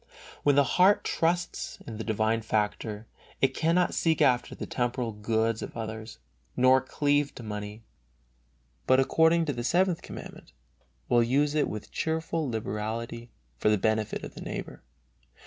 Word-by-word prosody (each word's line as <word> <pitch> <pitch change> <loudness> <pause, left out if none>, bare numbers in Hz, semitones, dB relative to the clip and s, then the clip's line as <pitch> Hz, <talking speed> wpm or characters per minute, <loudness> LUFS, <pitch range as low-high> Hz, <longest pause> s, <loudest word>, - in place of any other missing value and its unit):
When 145 -1 +3
the 140 - +6
heart 185 +9 +4
trusts 170 +1 -1
in 110 -2 -7
the - - -3
divine 110 +1 0
favor, 105 0 -2 0.3
it 135 - +2
cannot 170 +2 +2
seek 160 -2 +1
after 125 -2 +2
the - - -5
temporal 120 -1 -2
goods 110 +1 0
of - - -7
others, 110 0 -6 0.4
nor 130 +1 +5
cleave 145 0 0
to 120 - -9
money, 105 0 -6 1.0
but 130 0 +5
according 160 +4 +4
to 145 - -1
the 120 -1 -4
Seventh 175 +4 +2
Commandment, - - -10 0.5
will 120 -1 +4
use 140 +5 +2
it 155 -1 +1
with 105 -1 -7
cheerful 160 -1 -1
liberality 115 +1 -4 0.3
for 105 - +3
the 105 - +4
benefit 110 +1 0
of - - -7
the - - -10
neighbor. - - -6
120 Hz, 150 wpm, -28 LUFS, 110-150 Hz, 1.0 s, the